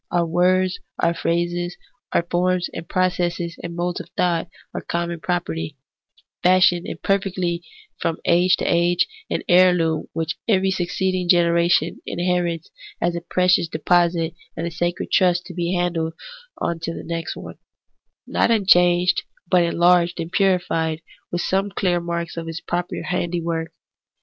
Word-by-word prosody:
Our 175 -1 +1
words, 185 +2 +2 0.2
our 170 - +2
phrases, 175 +1 -1 0.3
our - - +2
forms 180 +1 0
and 165 - -7
processes 175 -2 0
and 170 0 -6
modes 175 +1 -2
of - - -9
thought, 175 -1 +1 0.3
are - - -4
common 170 0 -3
property, 165 -4 -3 0.6
fashioned 180 -1 +4
and - - -6
per 195 0 +2
fected 180 -3 -2 0.4
from 165 -1 -1
age 180 +2 +4
to - - -3
age; 175 0 +2 0.2
an - - -2
heirloom 175 -4 +4
which 165 0 -2
every 190 -3 +3
suc 180 -2 -1
ceeding 185 -1 -1
generation 170 -1 +3
inherits 175 -2 -1 0.3
as 175 0 0
a 170 - -3
precious 180 0 +2
deposit 170 +1 +1 0.2
and 165 - -2
a 170 - -3
sacred 175 +1 -2
trust 180 -2 +3
to - - -9
be 175 +1 -1
handed 170 -2 -1 0.4
on 170 -1 -2
to 165 0 -4
the - - -7
next 165 -1 -4
one, - - -9 0.7
not - - +1
un 220 -4 +2
changed 175 -1 +4 0.3
but 180 - +5
enlarged 170 +1 +3
and 165 +1 -4
purified, 170 -5 +1 0.3
with 175 - -1
some 195 +2 0
clear 180 -3 0
marks 170 0 -4
of 165 0 -4
its 165 0 -4
proper 175 0 -3
handiwork. 170 -2 -2
175 Hz, 155 wpm, -22 LUFS, 170-180 Hz, 0.7 s, but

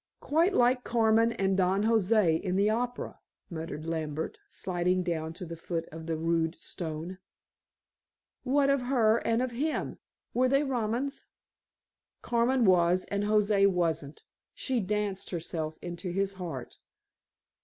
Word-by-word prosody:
"Quite 335 +6 +2
like 250 +1 +3
Carmen 225 0 +3
and 195 -3 +1
Don 190 +2 +2
José 215 -6 +3
in 185 -2 -2
the 200 +2 +3
opera," 245 +2 -3 0.3
murmured 160 -2 -5
Lambert, 160 -2 -3
sliding 180 0 0
down 160 -2 -2
to 180 +2 -7
the 170 0 -6
foot 165 0 -4
of 160 +1 -8
the 165 -1 -1
rude 165 0 0
stone. 165 +2 -5 1.2
"What 275 +1 +3
of 275 -2 +2
her 240 -3 +3
and 230 +1 +1
of 255 - -2
him? 290 +7 -2 0.3
Were 255 +1 +3
they 275 +2 +3
Romans?" 255 +1 -2 1.0
"Carmen 240 +1 +2
was 180 -1 +4
and 200 0 0
José 210 -1 +4
wasn't. 165 -5 -1 0.3
She 260 -3 -1
danced 205 -1 -2
herself 160 -2 -4
into 175 +1 -5
his 195 +2 -1
heart." 165 -10 -7
195 Hz, 135 wpm, -29 LUFS, 170-235 Hz, 1.2 s, was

